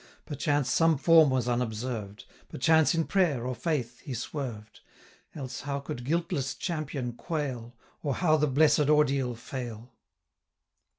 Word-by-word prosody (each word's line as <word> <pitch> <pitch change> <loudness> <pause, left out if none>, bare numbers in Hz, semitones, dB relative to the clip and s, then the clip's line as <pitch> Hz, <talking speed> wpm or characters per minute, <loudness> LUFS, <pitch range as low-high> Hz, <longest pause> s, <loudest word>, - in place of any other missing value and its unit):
Perchance 145 -2 0
some 165 -2 +3
form 160 0 +6
was 130 -2 0
unobserved; 115 -3 -3 0.2
Perchance 160 +3 +3
in 165 -1 +1
prayer, 160 -11 +1
or 130 - -2
faith, 125 -2 -2
he 130 - -6
swerved; 120 -4 -6 0.6
Else 130 -4 -6
how 140 0 -3
could 125 -3 -6
guiltless 140 -4 -1
champion 145 -8 -3
quail, 125 -5 -4 0.3
Or 140 -4 -1
how 155 -4 +3
the 150 0 +2
blessed 150 +1 +3
ordeal 140 -5 +2
fail? 120 0 -7
135 Hz, 130 wpm, -28 LUFS, 125-155 Hz, 0.6 s, form